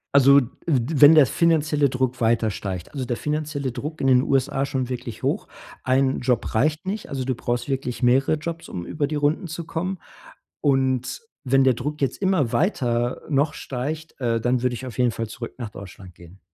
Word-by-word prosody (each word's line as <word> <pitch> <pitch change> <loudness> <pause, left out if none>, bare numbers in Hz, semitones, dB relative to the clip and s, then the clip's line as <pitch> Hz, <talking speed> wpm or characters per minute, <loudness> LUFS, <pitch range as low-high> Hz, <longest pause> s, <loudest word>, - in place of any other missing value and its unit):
Also, 140 0 +7
w 130 - -2 0.6
wenn 145 +2 +10
der 155 -3 +7
finanzielle 155 0 +2
Druck 130 -1 -2
weiter 115 -1 +2
steigt, 95 -3 -5
also 135 -3 -3
der 120 -1 -2
finanzielle 150 -4 -3
Druck 155 +3 -6
in 135 - 0
den 125 -1 +5
USA 135 0 +1
ist 140 - -1
schon 130 -2 -1
wirklich 120 -3 -6
hoch. - - -1 0.3
Ein 130 +1 +2
Job 125 -3 0
reicht 155 +9 +1
nicht. 210 +2 -4
Also, 135 -2 -3
du 130 -2 -1
brauchst 120 0 -2
wirklich 130 -3 -3
mehrere 130 +5 +3
Jobs, 165 +2 -6
um 85 -1 -5
über 150 -2 -2
die 150 - -3
Runden 150 +5 0
zu 165 +1 -6
kommen. 175 +3 -3 0.6
Und 130 - +1 0.2
wenn 135 0 +3
der 130 - +5
Druck 150 +6 -4
jetzt 135 - -1
immer 185 - +1
weiter, 120 - 0
äh, 150 - -5
noch 145 +3 +2
steigt, 150 +5 -5
äh, 115 -1 +1
dann 120 +1 +1
würde 125 -1 +1
ich 130 +3 -7
auf 125 - -8
jeden 125 -2 +3
Fall 115 +1 -4
zurück 115 +2 -8
nach 120 -4 -5
Deutschland 95 -2 -11
gehen. 85 +2 -16
130 Hz, 205 wpm, -23 LUFS, 120-150 Hz, 0.6 s, wenn